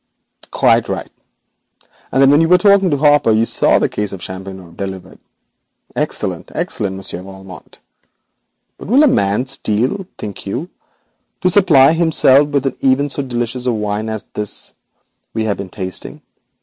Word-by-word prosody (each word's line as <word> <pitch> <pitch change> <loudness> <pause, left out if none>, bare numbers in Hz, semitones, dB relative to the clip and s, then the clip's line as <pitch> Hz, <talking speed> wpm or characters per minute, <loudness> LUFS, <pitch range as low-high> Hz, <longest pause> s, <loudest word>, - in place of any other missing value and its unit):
'Quite - - +2
right, - - -4 1.0
and 135 - 0
then 135 0 +6
when 145 +2 +5
you 165 - +3
were 180 - +7
talking 200 -1 +4
to 145 - +1
Hopper 145 -3 +4
you 110 +1 +3
saw - - +3
that - - +1
case 105 -1 -3
of 95 -3 -8
champagne 95 -2 -9
delivered. 95 -1 -7 0.8
Excellent! - - -3
excellent! 95 -2 -3
Monsieur 95 -2 -5
Valmont. 95 -1 -12 1.0
But - - -9
will 260 +9 +5
a - - +6
man 100 - +1
steal, 135 - -1
think 100 -1 -7
you, 100 - -2
even 175 - -10 0.7
to 185 - +3
supply 160 -7 +5
himself 150 -4 +4
with 140 -2 0 0.5
so 140 - -2
delicious 125 -1 -3
a - - +3
wine 105 0 -3
as 110 -1 -4
this 105 -1 -4 0.6
we 110 - 0
have 105 -2 -1
been 100 - -7
tasting? 95 0 -7
115 Hz, 155 wpm, -17 LUFS, 100-145 Hz, 1.0 s, were